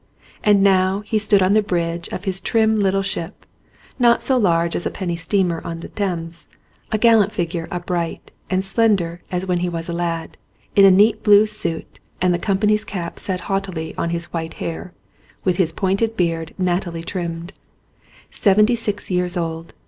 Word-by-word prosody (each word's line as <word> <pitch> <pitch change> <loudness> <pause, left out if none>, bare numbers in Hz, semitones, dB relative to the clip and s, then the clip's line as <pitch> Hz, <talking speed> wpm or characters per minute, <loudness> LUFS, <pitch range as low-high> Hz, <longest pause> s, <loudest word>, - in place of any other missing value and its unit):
And 205 -2 +4
now 190 0 +3
he 215 +1 -1
stood 205 -2 +3
on 185 +2 +3
the 215 - +5
bridge 170 -4 -2
of 185 - -6
his 190 -1 -2
trim 220 +1 +2
little 195 -2 +1
ship, 195 -1 -6 0.5
not 235 -1 +4
so 265 - +4
large 170 -7 +2
as - - -2
a - - -1
penny 175 -3 -3
steamer 170 0 0
on 165 0 -6
the - - -8
Thames, 170 -4 -4 0.4
a 215 - +2
gallant 220 -2 +4
figure, 170 -3 -3
upright 175 -1 -4 0.2
and 190 0 0
slender 195 -5 +1
as 180 0 -2
when 180 -2 0
he 180 0 -1
was 165 -1 -4
a - - -2
lad, 170 -1 -3 0.4
in 200 - +7
a - - +9
neat 205 +4 +4
blue 210 0 +6
suit 175 -6 -5 0.2
and 180 0 +2
the 175 - -1
com 195 +1 0
pany's 210 +1 +2
cap 175 -5 -6
set 185 -2 -3
jauntily 190 -5 -3
on 170 - -2
his 170 0 -4
white 165 -1 -4
hair, 170 +2 -5 0.5
with 180 -2 +1
his 170 -4 +4
pointed 200 +6 -1
beard 165 -2 -1
nattily 175 -2 -1
trimmed. 170 0 -5 0.8
Seventy 210 +3 +3
six 210 -4 -3
years 180 0 0
old. 165 -1 -4
185 Hz, 180 wpm, -20 LUFS, 170-205 Hz, 0.8 s, a